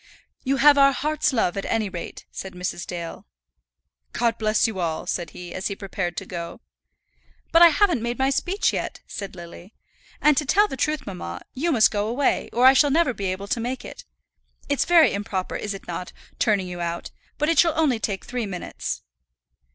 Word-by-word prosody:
"You 270 Hz, +1 st, +1 dB
have 285 Hz, +1 st, +6 dB
our 275 Hz, 0 st, +6 dB
hearts' 300 Hz, +3 st, 0 dB
love, 220 Hz, -8 st, +1 dB
at 195 Hz, -, -3 dB
any 220 Hz, -2 st, 0 dB
rate," 180 Hz, -3 st, -7 dB
said 190 Hz, -, -7 dB
Mrs. 180 Hz, -1 st, -4 dB
Dale. 170 Hz, -2 st, -6 dB, 0.9 s
"God 235 Hz, -1 st, 0 dB
bless 215 Hz, -1 st, +2 dB
you 220 Hz, -5 st, -2 dB
all!" 165 Hz, -3 st, -2 dB
said 175 Hz, -, -3 dB
he, 175 Hz, -1 st, -9 dB
as 185 Hz, -, -2 dB
he 200 Hz, -, -4 dB
prepared 190 Hz, -3 st, -4 dB
to -, -, -4 dB
go. 170 Hz, -2 st, -6 dB, 0.9 s
"But 330 Hz, -, +5 dB
I 345 Hz, -, +11 dB
haven't 335 Hz, -, +2 dB
made 235 Hz, +1 st, -2 dB
my 265 Hz, +1 st, +2 dB
speech 370 Hz, +8 st, 0 dB
yet," -, -, -4 dB
said 200 Hz, -2 st, -7 dB
Lily. 175 Hz, +3 st, -11 dB, 0.4 s
"And 300 Hz, -1 st, +4 dB
to 300 Hz, -, +1 dB
tell 415 Hz, +7 st, +4 dB
the 270 Hz, -, -5 dB
truth, 305 Hz, +3 st, -1 dB
mamma, 180 Hz, -, -6 dB
you 325 Hz, +6 st, 0 dB
must 225 Hz, -7 st, +5 dB
go 205 Hz, 0 st, -1 dB
away, 260 Hz, +5 st, 0 dB
or 245 Hz, +2 st, +3 dB
I 260 Hz, -, +9 dB
shall 290 Hz, +2 st, +4 dB
never 285 Hz, -2 st, +2 dB
be 200 Hz, -2 st, -5 dB
able 190 Hz, +2 st, -3 dB
to 235 Hz, -, 0 dB
make 245 Hz, +2 st, -4 dB
it. -, -, -10 dB, 0.6 s
It's 285 Hz, -1 st, +1 dB
very 335 Hz, -3 st, +5 dB
improper, 200 Hz, -2 st, -3 dB
is 205 Hz, -1 st, -3 dB
it 195 Hz, -, -11 dB
not, 180 Hz, +1 st, -5 dB, 0.3 s
turning 205 Hz, -5 st, +2 dB
you 175 Hz, -1 st, -6 dB
out, 170 Hz, 0 st, -4 dB, 0.3 s
but 300 Hz, -, 0 dB
it 330 Hz, -, +3 dB
shall 330 Hz, -3 st, +4 dB
only 275 Hz, -8 st, +2 dB
take 200 Hz, -3 st, -3 dB
three 245 Hz, -3 st, -3 dB
minutes." 180 Hz, -, -5 dB
225 Hz, 200 wpm, -24 LUFS, 185-280 Hz, 0.9 s, I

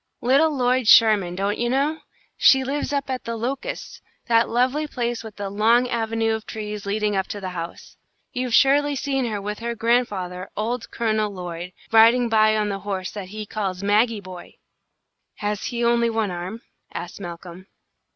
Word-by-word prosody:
Little 275 Hz, +6 st, +4 dB
Lloyd 255 Hz, -4 st, +1 dB
Sherman, 210 Hz, -6 st, +6 dB
don't 200 Hz, +2 st, -1 dB
you 240 Hz, 0 st, 0 dB
know? 285 Hz, +5 st, 0 dB, 0.4 s
She 265 Hz, -1 st, +5 dB
lives 280 Hz, +3 st, -2 dB
up 280 Hz, -1 st, -1 dB
at 255 Hz, -2 st, -3 dB
'The 230 Hz, -, -4 dB
Locusts,' 250 Hz, +4 st, -5 dB, 0.3 s
that 230 Hz, 0 st, +3 dB
lovely 255 Hz, +6 st, +1 dB
place 240 Hz, -4 st, -3 dB
with 220 Hz, -2 st, -10 dB
the 205 Hz, -1 st, -4 dB
long 230 Hz, +4 st, +3 dB
avenue 225 Hz, -1 st, 0 dB
of 220 Hz, 0 st, -5 dB
trees 210 Hz, -2 st, -6 dB
leading 210 Hz, 0 st, 0 dB
up 190 Hz, -1 st, 0 dB
to 205 Hz, -, -5 dB
the 185 Hz, -2 st, -5 dB
house. 170 Hz, -1 st, -8 dB, 0.4 s
You've 250 Hz, -2 st, 0 dB
surely 285 Hz, +1 st, +4 dB
seen 270 Hz, -1 st, -1 dB
her 215 Hz, -3 st, -2 dB
with 210 Hz, +1 st, -5 dB
her 235 Hz, 0 st, -3 dB
grandfather, 205 Hz, -6 st, -1 dB
old 230 Hz, +3 st, -2 dB
Colonel 215 Hz, -2 st, 0 dB
Lloyd, 180 Hz, -1 st, -7 dB, 0.2 s
riding 230 Hz, +2 st, +6 dB
by 215 Hz, -1 st, +4 dB
on 210 Hz, -1 st, 0 dB
the 195 Hz, -1 st, -3 dB
horse 195 Hz, -2 st, -4 dB
that 200 Hz, -3 st, -7 dB
he 215 Hz, +2 st, -7 dB
calls 200 Hz, -3 st, -4 dB
Maggie 215 Hz, +2 st, +2 dB
Boy." 185 Hz, -2 st, -11 dB, 0.8 s
"Has 210 Hz, 0 st, -3 dB
he 235 Hz, -1 st, -1 dB
only 235 Hz, 0 st, +3 dB
one 220 Hz, -3 st, -1 dB
arm?" 180 Hz, +6 st, -6 dB, 0.3 s
asked 175 Hz, +3 st, -7 dB
Malcolm. 175 Hz, +1 st, -9 dB
220 Hz, 175 wpm, -23 LUFS, 200-245 Hz, 0.8 s, Sherman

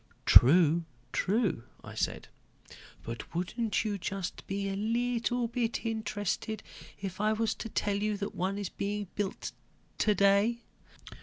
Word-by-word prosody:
"True, 165 Hz, +4 st, +7 dB, 0.3 s
true," 205 Hz, -, +1 dB, 0.2 s
I -, -, -9 dB
said. -, -, -2 dB, 0.8 s
"But 115 Hz, +7 st, -7 dB
wouldn't 220 Hz, +6 st, 0 dB
you 215 Hz, -, 0 dB
be 200 Hz, -, -2 dB
just 190 Hz, 0 st, -4 dB
a 195 Hz, 0 st, -1 dB
little 235 Hz, +3 st, 0 dB
bit 235 Hz, 0 st, -2 dB
interested 220 Hz, -1 st, -2 dB, 0.4 s
if 195 Hz, 0 st, -5 dB
I 215 Hz, +1 st, +3 dB
was 225 Hz, 0 st, +1 dB
to 225 Hz, -, -6 dB
tell 200 Hz, -1 st, 0 dB
you 210 Hz, 0 st, 0 dB
that 200 Hz, 0 st, -4 dB
one 190 Hz, +3 st, -1 dB
is 200 Hz, -3 st, -3 dB
being 205 Hz, -1 st, -3 dB
built 200 Hz, -2 st, -3 dB, 0.5 s
today?" 205 Hz, +3 st, +3 dB
205 Hz, 135 wpm, -31 LUFS, 195-225 Hz, 0.8 s, True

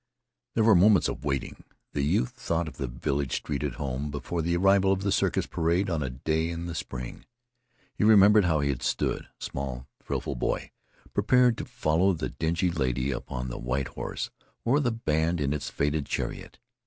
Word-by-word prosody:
There 115 Hz, -, +3 dB
were 110 Hz, 0 st, +6 dB
moments 100 Hz, +2 st, +5 dB
of -, -, -6 dB
waiting. 70 Hz, -2 st, -3 dB, 0.3 s
The 70 Hz, -, 0 dB
youth 95 Hz, -, +1 dB
thought 85 Hz, -10 st, -2 dB
of -, -, -9 dB
the 65 Hz, -, -2 dB
village 70 Hz, +2 st, -2 dB
street 70 Hz, -2 st, -3 dB
at 75 Hz, -4 st, -2 dB
home 70 Hz, +3 st, -3 dB
before 75 Hz, +4 st, -3 dB
the 85 Hz, +2 st, +1 dB
arrival 95 Hz, +1 st, +4 dB
of 95 Hz, 0 st, 0 dB
the 100 Hz, -, +1 dB
circus 95 Hz, -, +1 dB
parade 85 Hz, +3 st, 0 dB
on 80 Hz, -2 st, 0 dB
a 65 Hz, -, -1 dB
day 80 Hz, +6 st, -1 dB
in 85 Hz, 0 st, -4 dB
the 85 Hz, -, -4 dB
spring. 60 Hz, -5 st, -6 dB, 0.7 s
He -, -, -1 dB
remembered 105 Hz, -1 st, +7 dB
how 80 Hz, -4 st, +2 dB
he 70 Hz, -, 0 dB
had 65 Hz, -3 st, -2 dB
stood, -, -, -1 dB
a -, -, -9 dB
small, 65 Hz, -2 st, -5 dB, 0.2 s
thrillful -, -, -3 dB
boy, -, -, -2 dB, 0.4 s
prepared 125 Hz, -2 st, +4 dB
to -, -, -4 dB
follow 85 Hz, +5 st, +2 dB
the 80 Hz, -, -3 dB
dingy 85 Hz, +2 st, 0 dB
lady 65 Hz, -4 st, 0 dB
upon 65 Hz, 0 st, -4 dB
the -, -, -6 dB
white 65 Hz, +2 st, -2 dB
horse, -, -, -5 dB, 0.3 s
or 130 Hz, +5 st, +4 dB
the 135 Hz, -5 st, +1 dB
band 85 Hz, -7 st, 0 dB
in 70 Hz, -1 st, 0 dB
its 75 Hz, -, -3 dB
faded 75 Hz, 0 st, -1 dB
chariot. -, -, -4 dB
80 Hz, 190 wpm, -27 LUFS, 70-95 Hz, 0.7 s, remembered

